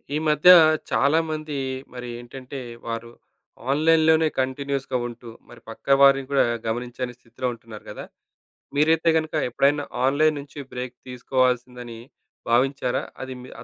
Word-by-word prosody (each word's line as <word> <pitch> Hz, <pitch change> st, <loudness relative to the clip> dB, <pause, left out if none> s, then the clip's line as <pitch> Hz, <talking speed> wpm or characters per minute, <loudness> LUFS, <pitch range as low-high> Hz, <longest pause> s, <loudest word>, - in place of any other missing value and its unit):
ఈ -, -, +2 dB
మధ్య 150 Hz, +3 st, +5 dB, 0.4 s
చాలా 145 Hz, +4 st, +3 dB
మంది 155 Hz, -2 st, -4 dB, 0.4 s
మరేంటంటే, 125 Hz, +2 st, -8 dB, 0.3 s
వారు 115 Hz, 0 st, -5 dB, 0.6 s
ఆన్‌లైన్‌లోనే 160 Hz, +2 st, +4 dB
కంటిన్యూయస్‌గా 135 Hz, 0 st, -2 dB
ఉంటూ, 120 Hz, 0 st, -10 dB, 0.2 s
మరి 120 Hz, -, -14 dB
పక్కవారిని 135 Hz, +3 st, +3 dB
గూడా 140 Hz, -, +4 dB, 0.2 s
గమనించని 125 Hz, +2 st, -3 dB
స్థితిలో 125 Hz, +1 st, -6 dB
ఉంటున్నారు 115 Hz, -2 st, -12 dB
గదా! -, -, -8 dB, 0.7 s
మీరైతే 160 Hz, +2 st, +3 dB
గనుక 160 Hz, 0 st, -3 dB, 0.2 s
ఎప్పుడైనా 140 Hz, +4 st, +1 dB, 0.2 s
ఆన్‌లైన్‌ 150 Hz, +3 st, +3 dB
నుంచి 140 Hz, +1 st, -10 dB
బ్రేక్ 125 Hz, 0 st, -5 dB
తీసుకోవాల్సిందని 125 Hz, -2 st, -1 dB, 0.5 s
భావించారా? 125 Hz, +1 st, +1 dB, 0.2 s
అది 130 Hz, 0 st, -5 dB
మి 125 Hz, -, -11 dB
ఆ -, -, -9 dB
130 Hz, 120 wpm, -24 LUFS, 120-145 Hz, 0.7 s, మధ్య